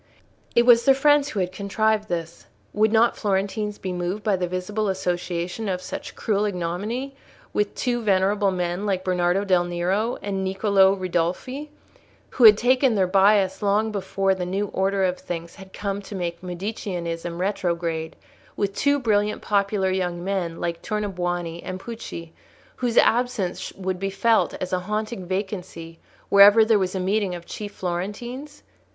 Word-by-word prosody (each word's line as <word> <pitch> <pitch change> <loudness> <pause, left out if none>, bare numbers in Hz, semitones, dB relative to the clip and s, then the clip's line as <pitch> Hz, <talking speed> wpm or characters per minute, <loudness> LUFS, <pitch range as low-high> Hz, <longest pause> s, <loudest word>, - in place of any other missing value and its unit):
It 235 - +5
was 235 -1 +7
their 270 -1 +5
friends 290 +1 +4
who 205 - -2
had 180 0 -2
contrived 210 +2 0
this: 170 -1 -5 0.3
would 215 +1 +3
not 230 +1 +4
Florentines 205 +1 -1
be 185 -1 -4
moved 180 +4 -3
by 210 -2 +2
the 180 -1 -2
visible 195 +4 -2
association 180 +2 -2
of 180 -1 -1
such - - -7
cruel 210 -1 0
ignominy 205 +9 -3 0.4
with 210 -1 0
two 240 -2 -1
venerable 200 0 +2
men 180 +2 -2
like 190 -2 0
Bernardo 180 +1 +1
del 180 -3 +3
Nero 185 +7 -1
and 195 -1 -2
Niccolò 195 0 +3
Ridolfi, 185 - -2 0.6
who 245 - +4
had 210 -2 +10
taken 255 +1 +3
their 190 -2 +3
bias 195 0 +3
long 210 +2 +1
before 195 -1 0
the 185 -1 -4
new 195 +3 -2
order 195 0 +1
of 185 -1 0
things 170 -1 -6
had 190 -1 -13
come 200 0 -3
to 200 +1 -9
make 170 -2 -4
Mediceanism 175 -3 -4
retrograde—with 175 +1 -3
two 285 +6 +2
brilliant 210 -5 0
popular 200 -2 +1
young 180 -2 -2
men 180 -4 -2
like 170 -1 -3
Tornabuoni 175 -5 -3
and 185 0 -5
Pucci, 185 -7 -8 0.4
whose 245 -2 -1
absence 225 -6 +2
would 185 -1 -4
be 195 +1 -1
felt 220 +4 +2
as 185 0 -5
a 185 - +2
haunting 210 0 -4
vacancy 180 -4 -5 0.3
wherever 205 +3 +8
there 220 -2 +4
was 185 0 -1
a - - -1
meeting 195 0 0
of 170 -1 -9
chief 205 +2 -7
Florentines? 205 +11 -5
195 Hz, 160 wpm, -24 LUFS, 180-210 Hz, 0.6 s, had